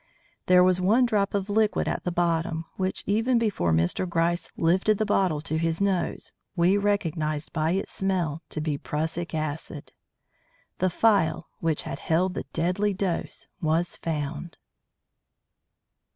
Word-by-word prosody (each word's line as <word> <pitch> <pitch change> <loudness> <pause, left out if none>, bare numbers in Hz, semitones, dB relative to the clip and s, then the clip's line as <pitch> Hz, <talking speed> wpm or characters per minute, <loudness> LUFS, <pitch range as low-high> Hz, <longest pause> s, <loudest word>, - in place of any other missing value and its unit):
There 180 0 +7
was 185 0 +3
one 220 +7 +4
drop 205 -4 +1
of 200 -1 -1
liquid 215 0 +1
at - - -2
the 180 - 0
bottom, 165 -1 0
which 190 0 -2
even 225 +5 +2
before 205 - +1
Mr. 85 - +1
Gryce 170 +1 0
lifted 185 +5 +3
the 215 - 0
bottle 185 -7 +1
to 160 0 -2
his 165 0 0
nose 195 -2 -1 0.2
we 175 +2 +4
recognised 165 -7 -1
by 160 +1 +1
its 195 +2 -2
smell 175 -5 -1
to - - -3
be 150 -2 -2
prussic 160 +2 -3
acid. 155 -1 -4 0.9
The 185 - +2
phial 170 -5 +2
which 160 -2 0
had 135 - -5
held 180 +3 +1
the - - -5
deadly 180 +5 0
dose 185 -3 -2 0.2
was 165 +2 0
found. 155 +1 -4
175 Hz, 145 wpm, -26 LUFS, 160-195 Hz, 0.9 s, There